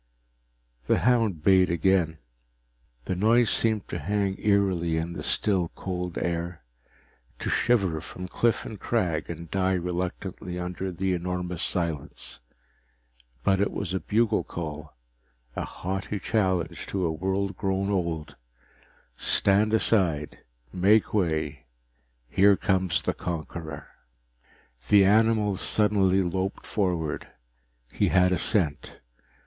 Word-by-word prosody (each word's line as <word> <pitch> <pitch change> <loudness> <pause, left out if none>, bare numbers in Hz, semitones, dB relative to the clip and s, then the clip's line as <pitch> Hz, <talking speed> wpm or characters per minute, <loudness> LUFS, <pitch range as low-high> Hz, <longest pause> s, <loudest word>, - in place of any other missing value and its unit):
The - - +3
hound 115 -10 +2
bayed 95 -1 +5
again. 85 -1 +2 0.9
The - - -1
noise 110 +4 +3
seemed 110 -3 +1
to 85 - -3
hang 100 +4 -1
eerily 95 -5 +1
in 85 +2 -2
the - - -6
still, 95 -5 +1
cold 90 -2 -4
air; 85 -2 -3 0.7
to - - -3
shiver 95 -10 +2
from 90 +2 -8
cliff 115 +4 0
and 110 - -7
crag 90 -10 -1
and 85 -1 -7
die 95 -1 +1
reluctantly 90 +1 -4
under 90 +1 -4
the 95 +1 -1
enormous 90 0 -3
silence. 85 -7 -1 1.0
But 95 +5 +2
it 100 - +2
was 95 -3 -3
a 95 - 0
bugle 110 +7 +1
call, 75 -4 -7 0.6
a - - -2
haughty 95 +3 -4
challenge 95 -6 -1
to 95 -2 -1
a 80 - +1
world 95 +4 -2
grown 95 +1 -1
old 85 -5 -2 0.8
stand 100 +2 +3
aside, 90 -9 +1 0.3
make 100 +4 +3
way, 80 - -1 0.6
here 100 +5 +4
comes 95 -3 +1
the - - 0
conqueror! 80 -2 -6 1.0
The 100 -2 +7
animal 105 -1 +3
suddenly 95 -3 +2
loped 95 +2 -3
forward. 90 -7 -1 0.7
He - - +1
had 90 0 +4
a 90 - +1
scent. 75 -9 0
95 Hz, 120 wpm, -26 LUFS, 85-100 Hz, 1.0 s, The